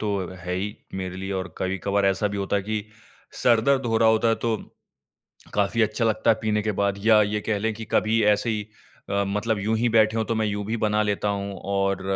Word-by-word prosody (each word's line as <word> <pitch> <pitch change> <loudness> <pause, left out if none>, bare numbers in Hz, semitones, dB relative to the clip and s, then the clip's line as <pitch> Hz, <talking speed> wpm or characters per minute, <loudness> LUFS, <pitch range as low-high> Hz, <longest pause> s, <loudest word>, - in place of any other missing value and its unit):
तो 105 -2 -1 0.2
है 90 +1 -3
ही 100 +3 -3 0.2
मेरे 95 -1 -4
लिए 95 +1 -4
और 95 -1 -4
कभी-कभार 100 +2 0
ऐसा 95 +2 +1
भी 100 - -5
होता 100 +1 -1
है 100 - -1
कि 105 0 -3 0.6
सर-दर्द 125 +2 +3
हो 115 -1 +1
रहा 115 - +5
होता 110 +1 +3
तो 115 -2 +1 1.0
काफ़ी 105 +3 +2
अच्छा 110 +2 0
लगता 110 +1 +2
है 110 - +4
पीने 105 -1 +1
के 105 0 -1
बाद। 100 -1 +2
या 110 -2 +7
ये 105 +1 -1
कह 105 -2 +1
लें 110 +2 -1
कि 110 +1 -7
कभी 110 +1 +2
ऐसे 105 +3 +2
ही 105 -2 -2 0.4
अ, 100 0 +1
मतलब 105 +2 -1
यूँ 110 +3 0
ही 120 +2 +1
बैठे 110 -1 +3
हों 110 - +1
तो 115 - -2
मैं 110 -1 0
यूँ 105 0 -2
भी 115 +2 -1
बना 105 -1 +1
लेता 105 0 -1
हूँ 100 0 -3
और 100 -1 0
105 Hz, 225 wpm, -24 LUFS, 100-110 Hz, 1.0 s, या